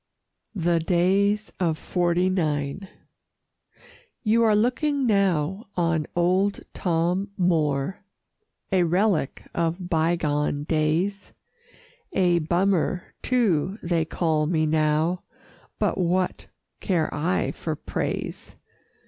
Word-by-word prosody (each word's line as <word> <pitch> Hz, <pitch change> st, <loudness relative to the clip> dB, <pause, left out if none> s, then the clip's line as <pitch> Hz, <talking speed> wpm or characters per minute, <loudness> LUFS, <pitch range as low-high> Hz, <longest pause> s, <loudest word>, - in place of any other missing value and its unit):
"THE 170 Hz, -2 st, +1 dB
DAYS 195 Hz, +5 st, +1 dB
OF 165 Hz, -4 st, +1 dB
'FORTY 175 Hz, +1 st, +1 dB
NINE" 155 Hz, 0 st, -1 dB, 1.4 s
You 225 Hz, +1 st, +3 dB
are 220 Hz, -2 st, +4 dB
looking 265 Hz, +5 st, +1 dB
now 195 Hz, -2 st, +1 dB
on 165 Hz, -3 st, +1 dB
old 185 Hz, +3 st, +2 dB
Tom 180 Hz, +3 st, 0 dB
Moore, 160 Hz, -3 st, +1 dB, 0.7 s
A 190 Hz, -2 st, +3 dB
relic 175 Hz, -3 st, +1 dB
of 170 Hz, +2 st, -2 dB
bygone 155 Hz, -3 st, +1 dB
days; 165 Hz, +6 st, -1 dB, 0.8 s
A 175 Hz, -2 st, +3 dB
Bummer, 175 Hz, +1 st, 0 dB
too, 200 Hz, -, +1 dB
they 170 Hz, -2 st, +1 dB
call 155 Hz, -2 st, 0 dB
me 160 Hz, -1 st, +1 dB
now, 155 Hz, +3 st, +1 dB, 0.6 s
But -, -, 0 dB
what 180 Hz, +1 st, 0 dB, 0.3 s
care 170 Hz, -6 st, 0 dB
I 165 Hz, +5 st, 0 dB
for 160 Hz, -2 st, -4 dB
praise? -, -, -4 dB
175 Hz, 95 wpm, -25 LUFS, 160-195 Hz, 1.4 s, are